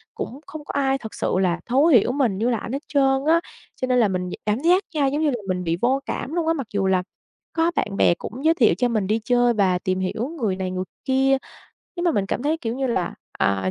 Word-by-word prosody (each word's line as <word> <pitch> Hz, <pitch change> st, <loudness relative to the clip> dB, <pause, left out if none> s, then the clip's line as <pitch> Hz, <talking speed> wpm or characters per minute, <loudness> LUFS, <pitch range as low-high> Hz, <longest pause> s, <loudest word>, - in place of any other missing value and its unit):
cũng 265 Hz, -, -5 dB
không 305 Hz, -2 st, -9 dB
có -, -, -5 dB
ai 270 Hz, -1 st, +1 dB
thật 220 Hz, -5 st, -9 dB
sự -, -, -2 dB
là 175 Hz, -2 st, +1 dB
thấu 260 Hz, +5 st, +3 dB
hiểu 245 Hz, -5 st, +5 dB
mình 250 Hz, -8 st, +1 dB
như 230 Hz, +4 st, +1 dB
là 235 Hz, -, +1 dB
ảnh 230 Hz, -, -6 dB
hết 280 Hz, -, -3 dB
trơn 270 Hz, -1 st, +2 dB
á. 335 Hz, +1 st, +4 dB, 0.4 s
Cho 255 Hz, -, 0 dB
nên 250 Hz, -1 st, +3 dB
là 220 Hz, -, +4 dB
mình 180 Hz, -1 st, -2 dB
d -, -, -6 dB
cảm 210 Hz, +3 st, +1 dB
giác 360 Hz, +5 st, +3 dB
nha 290 Hz, -3 st, +1 dB
giống 290 Hz, +3 st, -1 dB
như 305 Hz, -, +3 dB
là 245 Hz, -, -1 dB
mình 180 Hz, -1 st, -1 dB
bị 165 Hz, 0 st, -1 dB
vô 260 Hz, +3 st, +2 dB
cảm 280 Hz, -, -4 dB
luôn 340 Hz, -2 st, -1 dB
á, 325 Hz, -, +3 dB
mặc 270 Hz, -8 st, -4 dB
dù 195 Hz, -1 st, +1 dB
là 185 Hz, -1 st, +2 dB, 0.5 s
có 330 Hz, +1 st, +2 dB
bạn 195 Hz, -1 st, -1 dB
bè -, -, +5 dB
cũng 255 Hz, -, -8 dB
giới 325 Hz, -, +6 dB
thiệu 245 Hz, -9 st, +4 dB
cho 245 Hz, -, +2 dB
mình 215 Hz, -5 st, -1 dB
đi 215 Hz, +2 st, +1 dB
chơi 245 Hz, -1 st, +3 dB
và 190 Hz, -4 st, +2 dB
tìm 185 Hz, 0 st, -1 dB
hiểu 210 Hz, +7 st, -2 dB
người 200 Hz, -5 st, +1 dB
này 185 Hz, -1 st, -3 dB
người 185 Hz, 0 st, -2 dB, 0.2 s
kia, 270 Hz, 0 st, +3 dB, 0.6 s
nhưng 345 Hz, -, -2 dB
mà 345 Hz, -, +4 dB
mình 195 Hz, -1 st, 0 dB
cảm 245 Hz, -, -2 dB
thấy, 310 Hz, +3 st, +1 dB
kiểu 230 Hz, -3 st, -3 dB
như 270 Hz, -1 st, -1 dB
là, 185 Hz, -8 st, -1 dB, 0.2 s
à, 95 Hz, -1 st, +1 dB
245 Hz, 270 wpm, -23 LUFS, 195-275 Hz, 0.6 s, giới